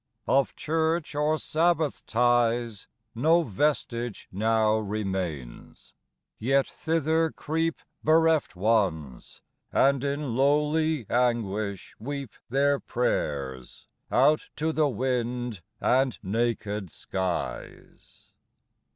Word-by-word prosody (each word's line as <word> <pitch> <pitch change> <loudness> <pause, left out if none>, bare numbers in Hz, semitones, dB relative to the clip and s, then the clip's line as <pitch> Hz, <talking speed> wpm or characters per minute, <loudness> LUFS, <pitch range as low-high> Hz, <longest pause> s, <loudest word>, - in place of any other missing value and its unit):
Of 135 0 +2
church, 160 +1 0
or 150 +2 +1
sabbath 160 -1 +1
ties, 120 -2 +1 0.3
5 115 - -7
No 165 +4 +5
vestige 120 -2 -1
now 110 +2 +2
remains; 95 - -5 0.5
yet 135 +4 +2
thither 160 0 0
creep 160 +1 -2 0.2
Bereft 160 -5 +3
Ones, 90 - -1 0.3
and 135 -1 +3
in 140 -3 -2
lowly 150 +1 +2
anguish 110 -5 -1
weep 140 +3 -5 0.2
Their 140 +2 +2
prayers 70 - -3 0.3
out 155 +1 +3
to 160 +1 0
the 155 -2 +2
wind 125 -3 -2 0.2
and 130 -1 +2
naked 105 -2 -1
skies. 95 +2 -5
125 Hz, 90 wpm, -27 LUFS, 105-150 Hz, 0.5 s, No